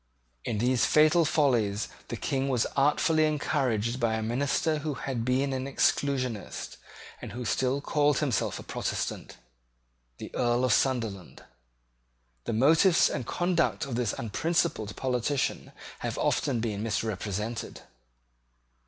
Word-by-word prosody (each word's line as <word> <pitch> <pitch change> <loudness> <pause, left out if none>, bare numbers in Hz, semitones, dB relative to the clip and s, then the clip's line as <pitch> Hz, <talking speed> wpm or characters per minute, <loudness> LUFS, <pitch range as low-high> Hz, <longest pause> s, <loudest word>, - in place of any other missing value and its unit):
In 110 - -2
these 125 +3 +2
fatal 155 +2 +5
follies 120 -10 +1 0.2
the - - -5
King 135 0 -1
was 125 -4 +1
artfully 150 +3 +3
encouraged 130 -6 0
by 115 -2 +1
a 110 - -2
minister 140 +6 0
who 150 -1 -3
had 130 -4 -3
been 130 +3 +1
an 130 0 -2
Exclusionist, 130 -5 -1 0.4
and - - -7
who 125 +1 -5
still 130 +4 0
called 145 -1 +2
himself 140 -7 0
a - - -8
Protestant, - - -4 0.8
the - - -9
Earl 120 +1 +1
of 125 - +3
Sunderland. 115 -8 -1 1.0
The - - -2
motives 160 - +4
and 130 -5 -4
conduct 175 -1 0
of 135 - -6
this 120 -3 0
unprincipled 115 -2 -1
politician 130 +2 -1 0.3
have - - -4
often 125 -6 0
been 105 -3 -2
misrepresented. 110 0 -3
130 Hz, 125 wpm, -28 LUFS, 115-145 Hz, 1.0 s, fatal